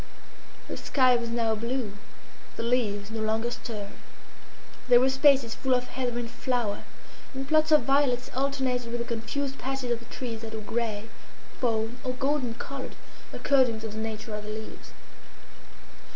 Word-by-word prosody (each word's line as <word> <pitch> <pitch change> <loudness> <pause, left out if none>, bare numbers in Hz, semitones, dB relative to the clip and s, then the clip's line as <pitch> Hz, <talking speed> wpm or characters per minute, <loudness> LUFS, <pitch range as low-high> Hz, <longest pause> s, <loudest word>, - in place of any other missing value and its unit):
The - - -5
sky 255 -3 +4
was 235 -1 -1
now 230 -1 +1
blue, 235 0 -2 0.6
the - - -3
leaves 220 -4 0
no 225 -1 -3
longer 220 +2 +1
stirred. 210 -4 -5 0.9
There 245 -1 +8
were 260 +1 +4
spaces 265 -3 +5
full 260 -1 +2
of 250 0 -1
heather 250 -2 -2
in 240 -1 -2
flower, 235 -3 -1 0.5
and 270 0 -3
plots 310 +1 +4
of 300 -4 +7
violets 270 -2 +2
alternated 260 -3 0
with 240 - -1
the 235 - -2
confused 250 +5 -3
patches 265 -1 -2
of 235 - +1
the 235 - -13
trees 230 -2 -5
that 225 -1 -6
were 220 - -4
grey, 220 -1 -2 0.5
fawn, 225 0 0
or 255 -2 -1
golden 265 -2 0
coloured, 270 +1 -6 0.4
according 255 -5 +3
to 220 - -4
the 215 +1 -5
nature 220 0 -4
of 210 0 -4
their 215 - -4
leaves. 220 0 -8
240 Hz, 165 wpm, -28 LUFS, 225-265 Hz, 0.9 s, There